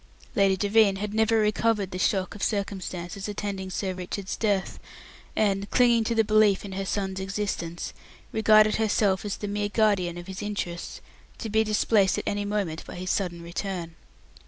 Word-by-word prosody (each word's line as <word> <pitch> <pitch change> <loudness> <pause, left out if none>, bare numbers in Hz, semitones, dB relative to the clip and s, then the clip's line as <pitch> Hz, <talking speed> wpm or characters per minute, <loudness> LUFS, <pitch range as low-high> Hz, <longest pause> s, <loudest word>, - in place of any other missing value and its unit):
Lady 195 -1 +4
Devine 205 0 +4
had 205 +1 -4
never 220 +1 +3
recovered 210 -2 +1
the 185 - -4
shock 185 -1 +1
of 205 - -10
the - - +3
circumstances 195 -2 -4
attending 200 -2 -4
Sir 185 0 -2
Richard's 185 +2 -5
death 200 -4 -1 0.6
and, 200 -1 +1
clinging 240 -2 +4
to 230 - 0
the 225 - +4
belief 215 -2 +3
in 200 - -7
her 195 +1 -3
son's 190 -1 -2
existence, 190 -3 -3 0.4
regarded 215 -1 +5
herself 205 -3 +2
as 205 - -3
the 205 - -5
mere 205 0 -1
guardian 200 -5 +2
of 175 - -7
his 190 0 -7
interests, 200 -5 -4 0.4
to 225 - -5
be 220 +1 +4
displaced 210 -2 +2
at - - -2
any 205 0 -1
moment 200 -6 -2
by - - -8
his 185 +1 -3
sudden 175 -4 -2
return. 175 -1 -4
200 Hz, 175 wpm, -26 LUFS, 190-215 Hz, 0.6 s, regarded